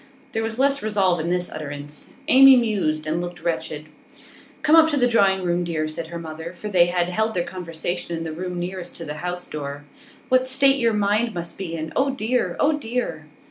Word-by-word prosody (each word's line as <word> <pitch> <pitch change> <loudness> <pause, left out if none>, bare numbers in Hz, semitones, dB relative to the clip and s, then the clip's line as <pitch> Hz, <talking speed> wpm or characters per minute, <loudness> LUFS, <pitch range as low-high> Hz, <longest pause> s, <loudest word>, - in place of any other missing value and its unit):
There 225 - -1
was 225 0 -3
less 275 +1 +2
resolve 195 -5 +1
in 160 - -2
this 180 0 -1
utterance. 145 -1 -7
Amy 270 -2 +8
mused, 195 -10 0
and 160 +3 -1
looked 175 0 -7
wretched. 155 -2 -3 0.8
'Come 305 - +5
up 320 0 +7
to 295 - 0
the 245 -2 +4
drawing 195 -5 +3
room, 175 0 0
dear,' 160 -2 -2
said 160 +1 -5
her 170 +1 -6
mother, 160 +1 -7
for 210 +4 -7
they 175 -3 +4
had 175 0 0
held 220 +4 -1
their 175 - +1
conversation 170 -1 -4
in 165 - -4
the 160 -1 -5
room 180 +2 -5
nearest 180 0 -5
to 165 - -7
the 150 - -4
house 180 0 -4
door. 145 -1 -6 0.4
'What 255 -1 +5
a - - -5
state 270 +1 +4
your 230 -2 +2
mind 210 +2 +1
must 170 -1 -5
be 170 -4 -5
in! 160 -1 -5
Oh 275 +1 +2
dear! 250 -1 -1
Oh 300 +2 +3
dear! 245 0 -3
180 Hz, 215 wpm, -23 LUFS, 165-225 Hz, 0.8 s, Amy